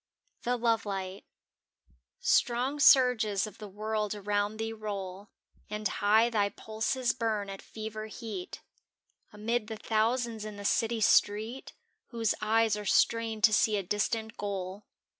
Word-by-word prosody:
XLhc 245 0 0
Xoveliobt 200 -4 -1 1.2
TRONG 255 +5 -2
surges 250 -8 +5
of 210 -2 -11
the 210 - -7
world 210 +1 -2
around 205 +1 -1
thee 225 0 -3
roll 200 -2 -6 0.4
And 210 0 -1
high 215 +5 +3
thy 205 -3 +2
pulses 220 +5 -1
burn 215 -5 -2
at 195 - -8
fever 215 0 -7
heat 215 -5 -7 0.7
Amid 215 +1 -2
the 220 -1 -5
thousands 225 +1 0
in 215 -1 -7
the 205 - -8
city 225 +2 +1
street 215 +5 +2 0.3
Whose 230 -3 0
eyes 220 0 +3
are 210 - -5
strained 225 +1 +1
to 215 - +6
see 210 0 +3
a 200 - -2
distant 220 +4 -2
goal. 195 0 -5
215 Hz, 135 wpm, -30 LUFS, 205-225 Hz, 1.2 s, to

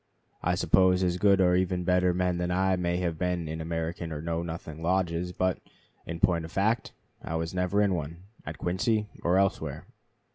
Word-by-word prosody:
I 90 0 +1
suppose 95 0 +4
as 90 -1 +1
good 100 0 +4
or 90 -1 +4
even 90 -1 0
better 90 0 +3
men 90 0 0
than 90 0 -1
I 95 +1 +2
may 90 -1 -1
have 85 -3 -2
been 90 -2 -1
in 80 +1 -4
American 80 +1 -3
or 75 - -4
Know 85 +1 -2
Nothing 80 -2 -7
lodges; 90 0 0
but, 95 0 0 0.5
in 85 0 -5
point 85 -1 +2
of 80 - -8
fact, 110 +4 0 0.3
I - - -11 0.3
never 90 +2 0
was 105 - +5
in 100 - +1
one, 85 +1 -5 0.2
at - - -7
Quincy 105 +4 0
or 90 +2 +2
elsewhere.... 95 0 0
90 Hz, 190 wpm, -28 LUFS, 85-95 Hz, 0.5 s, was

